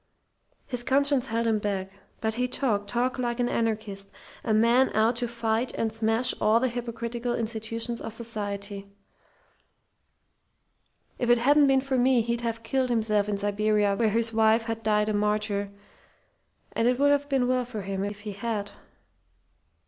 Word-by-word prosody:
His 245 -2 -3
conscience 275 +1 +2
held 230 +1 -1
him 220 -2 +2
back. 195 -2 -3 0.3
But 220 0 0
he 250 +2 0
talked 220 -6 -1
talked 245 +3 -1
like 240 -1 -2
an 245 - +2
anarchist, 215 -4 -2 0.3
a 225 - -1
man 235 +4 +4
out 225 +2 +3
to 240 0 -1
fight 230 +1 -1
and 225 -1 -1
smash 225 +3 +2
all 215 +2 +4
the 255 +1 +1
hypocritical 240 0 -4
institutions 230 +1 -3
of 225 - -5
society. 205 -3 -4 2.3
If 245 - 0
it 240 - +6
hadn't 285 +4 +4
been 270 -1 +4
for 265 -1 -1
me 250 -1 +4
he'd 235 +1 -2
have 230 -1 -3
killed 260 +2 0
himself 215 -3 +2
in 205 - -1
Siberia 205 0 +1
where 220 +1 +2
his 225 +1 0
wife 220 +1 +4
had 225 -1 -4
died 210 -1 +2
a 215 - 0
martyr; 210 -1 0 1.0
and 230 - +1
it 250 0 +2
would 285 +1 +4
have 285 0 +1
been 265 -3 +2
well 255 0 +1
for 230 -4 -6
him 195 0 -3
if 205 0 -5
he 210 0 -6
had! 205 0 -3
225 Hz, 165 wpm, -27 LUFS, 210-245 Hz, 2.3 s, it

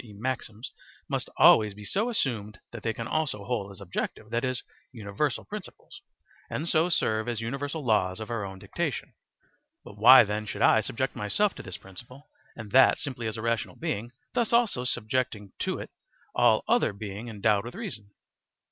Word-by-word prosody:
e., 110 -4 -13
maxims, 115 -1 -4 0.4
must - - -2
always 105 -2 +6
be 105 - -10
so 215 - 0
assumed 110 - -2
that 115 - -8
they 115 - 0
can 115 +1 -5
also 140 -9 -1
hold 105 -4 -2
as 100 - -11
objective, 100 +3 -5
that 120 0 0
is, 130 -1 -1 0.3
universal 115 +4 -2
principles, 210 -2 -9 0.5
and 155 - -3
so 165 +1 +3
serve 110 -8 +1
as 120 -2 -2
universal 140 +6 -4
laws 95 -4 +2
of 110 +2 -6
our 115 -3 -2
own 95 -1 -6
dictation. - - -4 0.7
But 105 - -12
why 130 +4 +10
then 105 0 -3
should - - -2
I 110 - +6
subject 125 +4 -3
myself 190 - +1
to - - -9
this 95 - -7
principle 120 +9 -13 0.2
and 110 -3 -9
that 130 +3 +6
simply 120 -5 -4
as 110 0 -3
a 110 - -5
rational 115 -1 -1
being, 120 -9 -3 0.2
thus 240 -2 +1
also 230 - +2
subjecting 115 -4 -1
to - - -1
it - - -8 0.4
all - - +4
other - - +3
being 105 +2 -7
endowed 105 -2 +1
with 120 - -7
reason? 120 - -6
115 Hz, 180 wpm, -28 LUFS, 105-130 Hz, 0.7 s, why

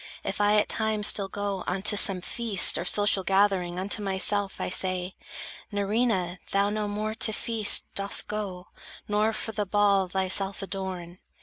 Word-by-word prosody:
If 195 +1 -4
I 205 +1 +3
at 210 - +2
times 220 -1 0
still 200 -2 +4
go 200 -1 -5
unto 190 +3 +2
some 195 -2 +6
feast, 220 -1 +3
Or - - -5
social 205 0 +2
gathering, 190 -2 +1
unto 200 +3 -2
myself 195 0 -1
I - - -3
say: 185 0 -2 0.6
"Nerina, 200 -3 -1
thou 200 +1 0
no 210 0 -3
more 210 +1 -4
to 220 - +1
feast 220 -1 0
Dost 200 0 0
go, 195 -4 -6 0.4
nor 210 +1 +1
for 220 0 -5
the 210 -2 -3
ball 200 -1 +2
thyself 190 +1 0
adorn." 185 -2 -6
200 Hz, 160 wpm, -26 LUFS, 190-210 Hz, 0.6 s, some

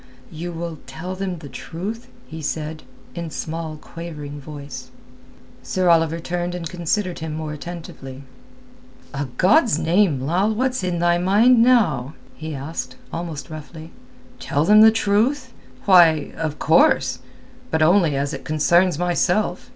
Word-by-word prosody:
you 170 +2 -6
will 165 -2 -6
tell 180 +4 -6
them 185 -2 -4
the 155 -3 -10
truth?" 190 - -6 0.2
he 160 0 -9
said, 155 +1 -4 0.3
in 170 -2 -5
small, 160 0 -5
quavering 150 -3 -8
voice. 140 -2 -9 0.7
Sir 185 -1 0
Oliver 165 -1 +3
turned 175 +1 -3
and 170 -2 -4
considered 180 +2 -2
him 160 -2 -5
more 155 -1 -4
attentively. 150 -5 -9 0.9
"A 140 +1 -2
God's 225 - +4
name, 170 -3 +2
Lal, 180 +11 0
what's 255 -2 -1
in 180 -1 -1
thy 175 0 +2
mind 220 +7 +4
now?" 210 - +3 0.2
he 155 -1 -6
asked, 140 +5 -5 0.2
almost 165 -3 -5
roughly. 155 +1 -9 0.5
"Tell 145 +2 0
them 210 +3 +7
the 220 - +9
truth? 225 +5 +1 0.3
Why, 170 -6 +5
of 155 -2 -3
course—but 130 0 0
only 170 -3 +4
as 140 +2 -2
it - - -6
concerns 170 +3 +2
myself. 180 +4 0
170 Hz, 135 wpm, -21 LUFS, 155-185 Hz, 0.9 s, the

